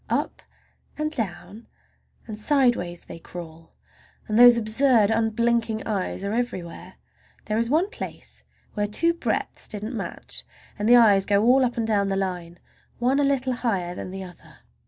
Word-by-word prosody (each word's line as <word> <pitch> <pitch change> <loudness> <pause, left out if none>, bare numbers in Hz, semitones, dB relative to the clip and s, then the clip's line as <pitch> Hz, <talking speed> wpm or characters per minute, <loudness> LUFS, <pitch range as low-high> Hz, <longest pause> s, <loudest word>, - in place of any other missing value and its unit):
Up - - -2 0.6
and 305 0 -2
down 205 - -6 0.6
and 215 - -7
sideways 215 - 0
they - - -10
crawl, 165 -1 -11 0.5
and 215 - -2
those 245 -1 +9
absurd, 225 -1 +3
unblinking 225 0 0
eyes 200 -2 -3
are 200 - -2
everywhere. 185 -6 -4 0.5
There 215 +1 -1
is 230 0 0
one 320 +7 +2
place - - -8 0.3
where 205 -1 -1
two 335 +11 +2
breadths 335 - -3
didn't 215 +3 -5
match, 200 - -5 0.4
and 210 +2 0
the 245 - +8
eyes 205 -5 +5
go 200 0 +3
all 260 +2 +5
up 245 -1 -1
and 230 - 0
down 205 -3 +1
the 195 - -1
line, 180 -3 -4 0.4
one 255 +4 +1
a - - +3
little 265 -2 +1
higher 195 -8 -2
than 180 - -7
the 190 +1 -6
other. 180 -2 -14
215 Hz, 160 wpm, -24 LUFS, 195-245 Hz, 0.6 s, those